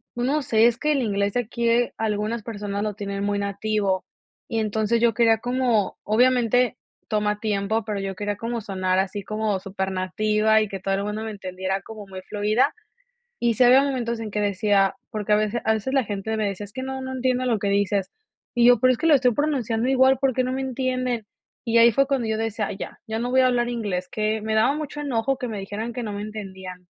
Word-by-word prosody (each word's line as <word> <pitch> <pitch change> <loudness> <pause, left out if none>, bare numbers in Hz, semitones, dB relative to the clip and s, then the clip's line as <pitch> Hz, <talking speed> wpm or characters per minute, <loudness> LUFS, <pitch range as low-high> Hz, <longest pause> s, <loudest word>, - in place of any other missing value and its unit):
no 265 +5 0
sé, 225 -3 +3
es 235 -1 +1
que 300 +2 +1
el 275 - +1
inglés 200 -3 0
de 245 - +2
aquí 235 +1 +1
algunas 215 +1 -1
personas 205 -2 -4
lo 210 -1 -2
tienen 200 -1 -4
muy 205 0 0
nativo 200 -1 -1 0.4
y 225 -3 -1
entonces, 220 +1 0
yo 235 -1 +4
quería 225 -1 +4
como 245 -4 0
obviamente 245 +2 +3 0.3
toma 210 -1 0
tiempo, 215 +1 -1
pero 210 -1 -3
yo 195 -1 -4
quería 205 +1 -3
como 230 +1 -3
sonar 185 -2 0
así 195 +1 -2
como 215 -1 -1
super 190 0 -4
nativa 215 +4 +2
y 215 - 0
que 195 - -5
todo 195 +1 -1
el 195 - -2
mundo 210 +1 -3
me 220 - -4
entendiera 190 -1 -4
como 215 0 -10
muy 190 -1 -8
fluida. 215 +8 +1 0.7
Y 235 -1 +1
sí 235 - +2
había 255 +3 +7
momentos 245 -4 -1
en 220 -1 -5
que 210 - -1
decía, 200 -1 +2
porque 210 -2 -2
a - - +6
vece 215 +2 -1
a 220 - +3
veces 220 +4 -3
la 270 -2 +3
gente 210 +1 -3
me 215 -2 0
decía: 200 +1 -5
"Es 205 - -13
que 260 - -5
no 265 0 -4
no 260 0 -5
entiendo 255 0 0
lo 235 -3 +1
que 205 - -1
dices". 200 -1 +1 0.4
Y 240 -1 +3
yo: 245 -2 +6
"Pero 255 +1 +5
es 245 - -3
que - - 0
lo 320 - +6
estoy 250 -3 +4
pronunciando 250 -5 0
igual, 265 0 +4
porque 260 -2 +2
no 255 - -2
me 265 +1 -2
entienden". 255 -3 -2 0.4
Y 230 -1 +3
ahí 230 0 +7
fue 275 +5 +3
cuando 270 -4 0
yo 220 0 -1
decía: 225 -1 -2
"Ay - - -5
ya, - - -7
ya 220 0 -3
no 245 +1 -2
voy 260 +1 +4
a - - +5
hablar 240 -1 +1
inglés", 205 -7 -3
que 215 0 -1
me 220 0 -1
daba 220 +6 +3
mucho 295 -1 -5
enojo 270 -2 0
que 250 -3 -4
me 215 -3 -4
dijeran 210 +4 -5
que 245 +1 -4
no 215 -3 -4
me 205 0 -4
entendían. 190 -4 -8
220 Hz, 230 wpm, -24 LUFS, 205-245 Hz, 0.7 s, había